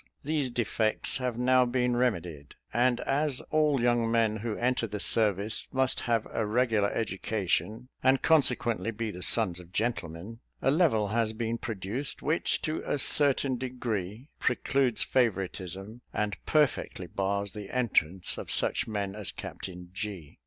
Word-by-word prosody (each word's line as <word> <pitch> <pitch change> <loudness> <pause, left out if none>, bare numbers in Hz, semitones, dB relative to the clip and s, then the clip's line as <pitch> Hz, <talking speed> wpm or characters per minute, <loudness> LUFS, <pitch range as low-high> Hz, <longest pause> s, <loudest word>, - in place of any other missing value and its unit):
These 145 -2 0
defects 110 -2 0
have 125 -3 -2
now 125 +1 +4
been 125 0 +1
remedied; 90 - -2 0.2
and 120 +1 +2
as 140 -1 +1
all 150 -3 +3
young 120 -1 +2
men 115 -2 +2
who 110 0 -3
enter 120 -1 0
the 105 0 -5
service 105 0 +1
must 130 -1 +1
have 115 -2 0
a 115 - 0
regular 110 -2 +2
education, 105 +1 -2
and 130 +1 +4
consequently 120 - +3
be 115 0 -3
the 90 - -9
sons 95 -4 +3
of 90 -1 -14
gentlemen, 105 -1 -3 0.2
a 135 - +2
level 135 - +3
has 110 0 0
been 115 +1 -2
produced, 110 +5 -3
which 155 +3 0
to 155 0 -2
a - - -1
certain 135 -2 +3
degree 120 - -4
precludes 135 -5 +1
favouritism, 95 -2 -2
and 105 -2 -1
perfectly 150 -4 +1
bars 100 +1 -2
the 105 -2 -8
entrance 95 -8 0
to - - -6
such - - +2
men 100 -3 -3
as 105 -1 -3
Captain 90 -1 -8
G 95 -7 -6
115 Hz, 145 wpm, -29 LUFS, 100-125 Hz, 0.2 s, now